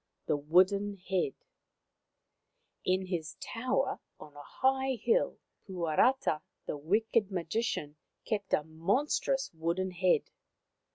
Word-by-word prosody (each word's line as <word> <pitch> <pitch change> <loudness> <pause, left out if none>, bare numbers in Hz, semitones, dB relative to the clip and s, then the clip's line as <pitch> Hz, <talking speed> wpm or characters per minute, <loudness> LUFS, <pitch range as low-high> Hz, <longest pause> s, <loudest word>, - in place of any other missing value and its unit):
THE - - +2
WOODEN 190 +7 +3
HEAD 180 -6 -1 1.5
In 185 +1 +1
his 165 -5 -4
tower 255 - -1 0.2
on 150 -1 -12
a 145 - -9
high 265 - +1
hill 455 - +1 0.3
Puarata 175 0 +2 0.2
the - - -3
wicked 205 +7 +1
magician 170 -4 -2 0.3
kept 205 -3 -2
a 150 - +3
monstrous 205 - 0
wooden 170 +4 -1
head. 180 0 +2
185 Hz, 105 wpm, -31 LUFS, 160-225 Hz, 1.5 s, WOODEN